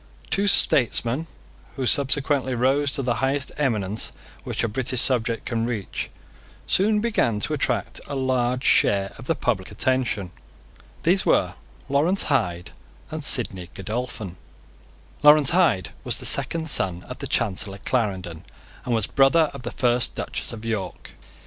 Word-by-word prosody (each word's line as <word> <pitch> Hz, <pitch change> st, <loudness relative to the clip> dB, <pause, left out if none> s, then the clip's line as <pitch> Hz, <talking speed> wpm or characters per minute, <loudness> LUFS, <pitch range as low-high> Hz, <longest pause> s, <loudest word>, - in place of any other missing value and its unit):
Two 200 Hz, +1 st, +2 dB
statesmen, 130 Hz, -, +3 dB, 0.5 s
who 135 Hz, -, -2 dB
subsequently 135 Hz, +1 st, +2 dB
rose 135 Hz, +3 st, +2 dB
to 135 Hz, +2 st, -2 dB
the 120 Hz, -1 st, 0 dB
highest 135 Hz, +1 st, 0 dB
eminence 110 Hz, -7 st, -1 dB, 0.3 s
which -, -, -3 dB
a -, -, +2 dB
British 125 Hz, +2 st, -1 dB
subject 120 Hz, -3 st, +1 dB
can 115 Hz, -1 st, -1 dB
reach, 110 Hz, -6 st, -4 dB, 0.6 s
soon 210 Hz, +2 st, +2 dB
began 165 Hz, -, +1 dB
to 155 Hz, -, +1 dB
attract 145 Hz, -, -1 dB
a 145 Hz, -, -5 dB
large 130 Hz, -1 st, 0 dB
share 100 Hz, -5 st, +3 dB
of 130 Hz, -, -9 dB
the 165 Hz, -, +1 dB
public 105 Hz, -10 st, -1 dB
attention. 105 Hz, -4 st, -1 dB, 0.7 s
These -, -, +3 dB
were -, -, +2 dB, 0.3 s
Lawrence 155 Hz, +8 st, +2 dB
Hyde 90 Hz, -9 st, -1 dB, 0.4 s
and -, -, -5 dB
Sidney 90 Hz, -2 st, +1 dB
Godolphin. 105 Hz, -2 st, -5 dB, 0.8 s
Lawrence 150 Hz, -1 st, +6 dB
Hyde 100 Hz, -, +2 dB
was -, -, +1 dB
the -, -, -6 dB
second 165 Hz, -1 st, +1 dB
son 90 Hz, -, 0 dB
of -, -, -9 dB
the -, -, -4 dB
Chancellor 100 Hz, -2 st, -1 dB
Clarendon, 95 Hz, -8 st, -2 dB, 0.4 s
and 120 Hz, -, 0 dB
was 110 Hz, -3 st, +1 dB
brother 145 Hz, +3 st, +3 dB
of -, -, -8 dB
the 120 Hz, -, -4 dB
first 120 Hz, -1 st, +1 dB
Duchess -, -, -4 dB
of 115 Hz, -1 st, -8 dB
York. 110 Hz, -4 st, -4 dB
125 Hz, 145 wpm, -24 LUFS, 105-140 Hz, 0.8 s, Lawrence